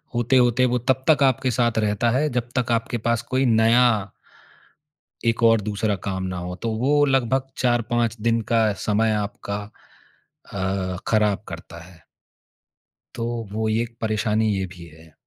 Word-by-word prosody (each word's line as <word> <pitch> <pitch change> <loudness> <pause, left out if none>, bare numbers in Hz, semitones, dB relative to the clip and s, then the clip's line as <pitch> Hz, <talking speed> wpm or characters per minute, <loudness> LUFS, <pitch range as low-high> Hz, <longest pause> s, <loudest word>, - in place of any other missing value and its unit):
होते-होते, 120 +1 +3
वो 125 0 +1
तब 130 +2 0
तक 145 -3 +5
आपके 130 -1 +2
साथ 120 -1 +1
रहता 105 +2 +1
है, 145 +5 +1
जब 120 -2 -3
तक 125 -1 0
आपके 115 +1 0
पास 115 +1 0
कोई 130 +3 -1
नया 115 -3 +3 1.1
एक 115 0 +1
और 115 -2 +5
दूसरा 105 0 -1
काम 95 -1 -3
ना 90 -1 -4
हो, 90 +1 -5
तो 115 - -4
वो 145 +5 +3
लगभग 130 -1 +1
4-5 120 -2 0
दिन 115 +1 +1
का 115 -1 +4 0.2
समय 110 +1 +2
आपका 100 -1 -3 1.0
अ, 95 -1 -2
खराब 105 -2 +2
करता 85 - -9
है। 90 -1 -17 1.2
तो 115 - -3 0.3
वो 110 +1 -2
एक 115 +2 -1
परेशानी 110 0 0
ये 95 - -2
भी 85 -1 -11
है। 80 0 -17
115 Hz, 155 wpm, -23 LUFS, 105-120 Hz, 1.2 s, तक